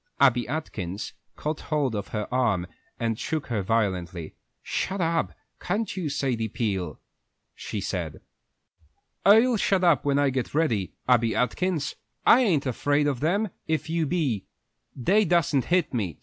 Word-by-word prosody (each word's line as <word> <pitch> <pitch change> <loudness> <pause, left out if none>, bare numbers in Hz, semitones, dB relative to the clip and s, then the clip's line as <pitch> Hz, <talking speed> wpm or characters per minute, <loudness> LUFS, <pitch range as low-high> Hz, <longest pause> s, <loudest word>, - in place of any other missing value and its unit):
Abby 125 -4 +4
Atkins 110 - -4 0.2
caught 155 +1 -3
hold 145 -6 0
of 100 -2 -3
her 105 -1 -3
arm 110 -9 +2 0.3
and 115 -2 -1
shook 155 -2 -2
her 110 -4 0
violently. 95 -6 -1 0.3
"Shut 195 +1 -2
up, 165 -1 +1 0.3
can't 205 +5 -2
you, 175 -5 -2
Sadie 130 -5 -1
Peel," 95 - -2 0.5
she - - -5
said. - - -3 1.0
"I'll 225 +4 +6
shut 195 -2 +2
up 170 -7 +4
when 140 -1 +2
I 145 -1 +3
get 130 +1 -3
ready, 115 - +1
Abby 120 -3 +3
Atkins! 150 +5 0 0.3
I 250 - +7
ain't 170 - +2
afraid 145 +3 +1
of 140 -4 0
them 200 - +1 0.2
if 160 0 -1
you 165 -2 +1
be. 135 - -1 0.5
They 195 - +3
dassen't 160 -7 +2
hit 175 -4 +1
me. 100 - -2
140 Hz, 150 wpm, -26 LUFS, 115-165 Hz, 1.0 s, I